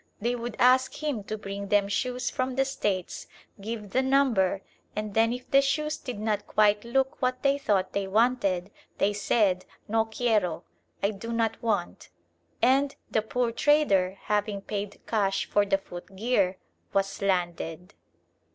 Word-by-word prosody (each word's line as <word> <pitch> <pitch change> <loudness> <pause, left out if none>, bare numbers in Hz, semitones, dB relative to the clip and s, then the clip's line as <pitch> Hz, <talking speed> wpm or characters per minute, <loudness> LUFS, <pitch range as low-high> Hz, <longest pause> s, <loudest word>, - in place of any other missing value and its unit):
They 235 +3 0
would 240 -1 -5
ask 255 +2 +4
him 275 -9 -1
to 215 - -4
bring 200 -1 -6
them 205 0 +3
shoes 250 +4 -1
from 255 0 -2
the 270 +1 +2
States, 200 -9 -2 0.3
give 210 -1 -5
the 260 - +3
number, 255 -9 +2 0.3
and 210 -1 -3
then 225 +2 +3
if 250 +1 -6
the 275 - +6
shoes 300 +3 0
did 250 -5 -6
not 210 -1 -1
quite 210 -1 +3
look 265 +3 0
what 255 0 0
they 280 0 +3
thought 205 -8 0
they 200 -1 -1
wanted, 200 -4 +1 0.3
they 205 +1 +2
said 200 -2 +2 0.2
"No 225 +1 +2
quiero" 215 -7 0 0.4
("I 200 - +3
do 215 +3 -7
not 225 -1 0
want"), 205 -6 -2 0.5
and 270 +3 +3 0.2
the 220 - +2
poor 235 +2 -1
trader, 200 -10 +3
having 205 -1 -1
paid 205 0 -5
cash 195 -3 0
for 205 0 +2
the 195 0 +3
footgear, 195 +1 -1 0.4
was 195 0 0
"landed." 180 -1 -2
215 Hz, 155 wpm, -27 LUFS, 195-250 Hz, 0.5 s, the